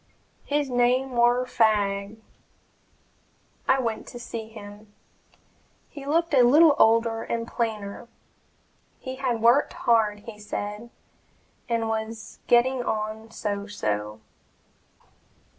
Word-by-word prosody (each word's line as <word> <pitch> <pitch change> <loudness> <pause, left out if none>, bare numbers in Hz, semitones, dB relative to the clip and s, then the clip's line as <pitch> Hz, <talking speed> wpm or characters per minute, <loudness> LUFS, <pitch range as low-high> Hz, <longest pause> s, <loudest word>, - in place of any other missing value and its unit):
"His 290 0 0
name 250 +2 +2
war 240 +1 +3
Fagg." 205 -3 +1 1.5
I 265 - +4
went 230 -4 -3
to - - -9
see 230 -2 -6
him. 205 -1 -12 1.0
He 280 -2 -10
looked 335 +2 +1
a 265 - +6
little 290 +5 +6
older 225 0 +3
and 230 0 -3
plainer. 220 -2 -4 0.9
He 260 -1 -7
had 245 -4 -2
worked 240 +5 +4
hard, 215 -3 +1
he 210 -1 -11
said, 210 +2 -5 0.8
and 230 -1 0
was 220 0 -5
getting 250 +2 +3
on 215 0 -3
"so 205 -2 -4
so." 105 - -3
230 Hz, 110 wpm, -25 LUFS, 210-245 Hz, 1.5 s, a